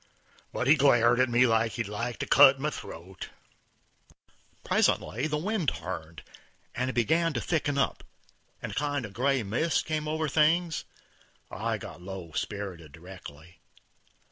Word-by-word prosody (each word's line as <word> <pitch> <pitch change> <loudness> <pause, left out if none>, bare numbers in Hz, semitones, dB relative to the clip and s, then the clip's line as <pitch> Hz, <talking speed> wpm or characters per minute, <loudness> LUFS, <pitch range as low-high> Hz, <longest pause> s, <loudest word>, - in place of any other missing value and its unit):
But - - -2
he 140 - +7
glared 120 -3 +4
at 130 0 +3
me 120 +1 +4
like 115 -1 +2
he'd 115 -2 -3
like 115 +4 -4
to - - -3
cut 135 -1 +7
my 150 +2 -1
throat. 90 - -9 1.3
Presently 125 +8 +1
the 150 -1 -1
wind 185 - 0
turned; 85 -3 -7 0.5
it 130 +1 -2
begun 160 +7 +2
to 120 - -1
thicken 145 -2 -1
up, 140 - 0 0.6
and - - -4
a - - -7
kind 145 -3 -1
of 105 - -10
gray 130 +2 +1
mist 125 +10 0
came 155 -1 -2
over 155 0 -1
things; 160 +3 +2 0.7
I - - -2
got - - -10
low 90 -2 -8
spirited 95 -7 -5
directly. 85 -1 -12
125 Hz, 145 wpm, -28 LUFS, 100-150 Hz, 1.3 s, he